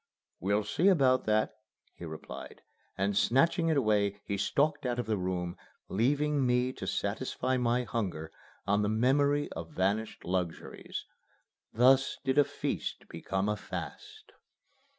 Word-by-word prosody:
"We'll 100 +3 +1
see 170 - +1
about 135 -9 +4
that," 110 0 +2 0.4
he 85 - -9
replied, 80 -1 -9 0.3
and, 100 +1 0
snatching 165 - +3
it 155 - +2
away, 105 -5 +2
he 100 - -2
stalked 145 +9 +1
out 125 -2 -1
of 120 - -1
the 110 - 0
room, 90 -2 -3 0.3
leaving 145 +6 +1
me 125 +1 +2
to - - -7
satisfy 130 0 -1
my 125 0 +1
hunger 95 -9 -3 0.3
on 100 +1 +2
the 105 - +1
memory 140 +6 +2
of 80 0 -6
vanished 100 +4 -1
luxuries. 90 -2 -3 0.7
Thus 130 +3 +4
did 135 +2 +3
a - - +8
feast - - -4
become 95 +1 -2
a 105 - +1
fast. 420 - -8
115 Hz, 140 wpm, -30 LUFS, 100-135 Hz, 0.7 s, a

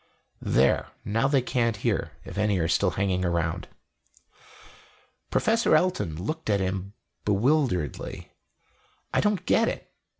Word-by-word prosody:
"There; - - +2 0.2
now 115 +5 +1
they 135 -3 +2
can't 115 -3 +1
hear - - -1
if - - -8
any 105 0 +1
are 80 -2 +1
still 90 +3 +2
hanging 95 -1 0
around." 85 0 -1 1.6
Professor 225 -5 +3
Elton 155 - +1
looked 155 - -4
at 100 -1 +3
him 95 +1 -2 0.3
bewilderedly. 105 - 0 0.8
"I - - +3
don't 210 -2 0
get 230 - +3
it. - - -7
105 Hz, 125 wpm, -26 LUFS, 90-140 Hz, 1.6 s, Professor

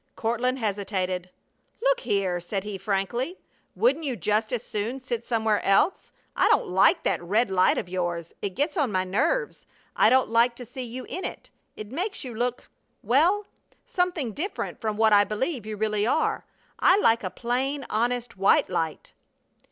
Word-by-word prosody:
Courtland 240 +3 0
hesitated. 190 -5 -2 0.5
"Look - - +2
here," 195 - 0
said 190 +3 -4
he, 205 -2 -5
frankly, 215 - -2 0.4
"Wouldn't 455 -8 +2
you 270 -5 -2
just 215 +3 0
as 245 -2 -2
soon 225 +5 -3
sit 245 -3 -4
somewhere 220 -3 0
else? 195 - +2 0.2
I - - +3
don't - - +3
like 190 +2 +4
that - - 0
red 205 +5 +1
light 185 -1 +3
of - - -3
yours. 175 -2 -3
It 195 -3 -3
gets 295 +2 0
on 280 -8 +1
my 185 -1 +1
nerves. 455 - -1 0.3
I - - +5
don't 260 -2 +3
like 235 +1 +4
to 245 - -9
see 255 +3 -7
you 250 +1 -6
in 370 - -5
it. - - -6 0.2
It 215 0 -8
makes 370 +8 -3
you 250 -3 -6
look 245 +2 -2 0.4
well 350 - +3 0.4
something 355 -9 -1
different 340 - -4
from 215 -2 -2
what 220 -1 +4
I 205 0 +7
believe 215 - -3
you 215 -1 -5
really 215 0 0
are. 315 - 0 0.3
I 370 - +5
like 230 - +3
a - - -2
plain, 260 +3 -2
honest 240 +2 -1
white 195 -1 +3
light." 165 -3 -3
230 Hz, 175 wpm, -26 LUFS, 200-260 Hz, 0.5 s, I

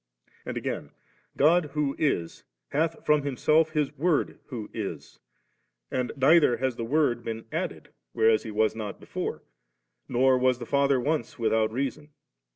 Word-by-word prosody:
And - - -3
again, - - -4 0.4
God 165 +4 +4
who 145 -2 0
is^ 85 - -1 0.3
hath 160 +3 -1
from 150 -1 +4
Himself 155 +3 +2
His 150 -2 0
Word 155 +1 0
who 125 -5 -5
also - - -13
is; 95 -8 -6 0.7
and 125 -1 -1
neither 140 -2 +5
hath 130 0 -1
the 115 - -4
Word 125 -2 +1
been 115 0 -5
added, - - -4 0.2
whereas 110 - +3
He 110 - -7
was 110 +1 +1
not 105 -3 -5
before, - - -5 0.7
nor 130 +1 +3
was 130 -1 +3
the 120 - -7
Father 140 +1 +2
once 145 -1 -2
without 110 -1 +1
Reason. 140 +4 -3
130 Hz, 155 wpm, -27 LUFS, 115-150 Hz, 0.7 s, neither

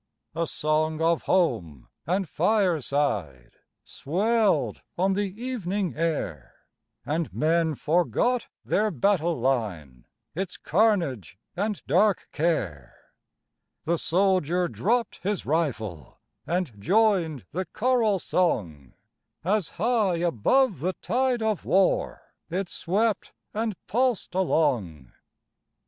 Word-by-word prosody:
A 165 +1 -1
song 155 +1 0
of 165 0 +2
home 100 - 0 0.2
and 185 +2 0
fireside 145 - 0 0.3
Swelled 210 +7 0 0.2
on 190 +2 +2
the 200 0 0
evening 205 - -2
air, 145 - -3 0.5
And 160 +2 -1
men 160 0 +1
forgot 180 - +1 0.2
their 215 +1 +2
battle 175 -7 +1
line, 100 - -2 0.3
Its 185 +3 -4
carnage 165 - +1 0.2
and 205 +2 -2
dark 190 +6 +2
care; 105 - -2 0.7
The 170 0 0
soldier 180 -1 +2
dropp'd 235 +7 -1
his 200 +1 -2
rifle 110 - -2 0.3
And 165 - -2
joined 180 - +2
the 185 +3 -2
choral 220 0 +1
song, 90 - -1 0.5
As 195 0 +1
high 215 -2 +2
above 175 - +2
the 180 +6 -1
tide 245 +5 0
of 215 -3 0
war 190 0 +1 0.2
It 180 +2 -2
swept 210 +5 -1 0.2
and 220 -1 -1
pulsed 245 -2 0
along. 120 - 0
175 Hz, 100 wpm, -26 LUFS, 145-205 Hz, 0.7 s, of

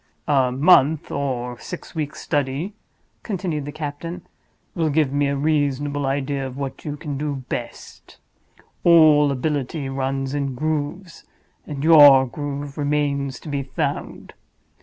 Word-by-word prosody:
"A 135 -4 +3
month 145 +1 +4
or 125 -4 -3
six 180 - -8
weeks' 155 -3 -4
study," 145 +7 -2 0.5
continued 175 -8 -3
the 145 - -5
captain, 155 +4 -6 0.5
"will 165 -2 0
give 150 -2 +1
me 145 0 +2
a 140 - -1
reasonable 145 -1 0
idea 135 0 -1
of 130 0 -9
what 140 -1 -5
you 150 -1 -5
can 145 -2 -5
do 145 -3 -3
best. 120 - -7 0.7
All 155 -4 +6
ability 140 +1 -2
runs 135 0 -2
in 140 -2 -2
grooves; 155 +5 -3 0.4
and 145 -2 -5
your 145 -5 +8
groove 145 +3 -6
remains 140 -2 -1
to - - -12
be 145 -2 -2
found. 135 - -4
145 Hz, 135 wpm, -22 LUFS, 135-155 Hz, 0.7 s, your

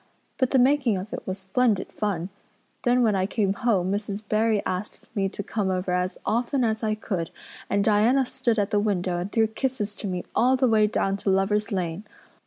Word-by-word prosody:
But 260 -3 +2
the 270 - +3
making 260 -4 +3
of 190 +4 -6
it - - -6
was 185 0 -2
splendid 200 +2 0
fun. 195 -4 -2 0.5
Then 245 0 +3
when 220 -3 +3
I 190 -1 +1
came 200 -2 0
home 200 -6 +1
Mrs. 205 0 -3
Barry 215 0 +1
asked 185 +3 -4
me 195 -2 +1
to 205 - -6
come 200 -1 -2
over 185 0 -1
as 180 +1 -1
often 245 +4 +1
as 220 -1 0
I 215 -1 0
could 185 -6 -3 0.4
and 200 0 +2
Diana 225 +6 +3
stood 240 -2 -1
at 205 -1 0
the 205 - +3
window 185 -4 0
and 185 +3 -4
threw 225 -2 +3
kisses 220 -1 -2
to - - -4
me 180 -2 -3
all 255 +2 +4
the 260 0 +2
way 215 -2 +4
down 195 -2 0
to 200 - -2
Lover's 205 +3 +1
Lane. 180 -1 -2
210 Hz, 205 wpm, -25 LUFS, 190-230 Hz, 0.5 s, all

